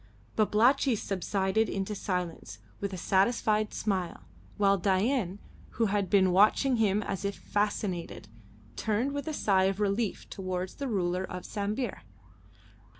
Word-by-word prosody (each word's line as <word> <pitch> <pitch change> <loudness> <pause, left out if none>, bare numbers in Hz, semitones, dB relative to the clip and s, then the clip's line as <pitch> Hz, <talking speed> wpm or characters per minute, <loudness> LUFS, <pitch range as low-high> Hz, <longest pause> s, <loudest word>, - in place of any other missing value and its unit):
Babalatchi 235 +5 +3
subsided 195 +1 0
into 195 +2 -2
silence 180 - -4 0.2
with 200 - -3
a 185 - -5
satisfied 210 +3 +2
smile, 185 - -2 0.4
while 200 -1 +3
Dain, 195 +1 +1 0.4
who 230 - +3
had 200 -2 0
been 190 -3 +4
watching 215 +7 +4
him 210 -1 +2
as 195 -1 -4
if 200 0 -2
fascinated, 205 - -2 0.5
turned 225 +5 0
with 285 +2 -4
a 315 - -2
sigh 190 -6 +3
of 195 +1 0
relief 210 +1 -1
towards 185 -1 -4
the 280 - -4
ruler 185 -5 0
of 180 -1 -6
Sambir. 210 +3 -3
200 Hz, 135 wpm, -29 LUFS, 190-215 Hz, 0.5 s, been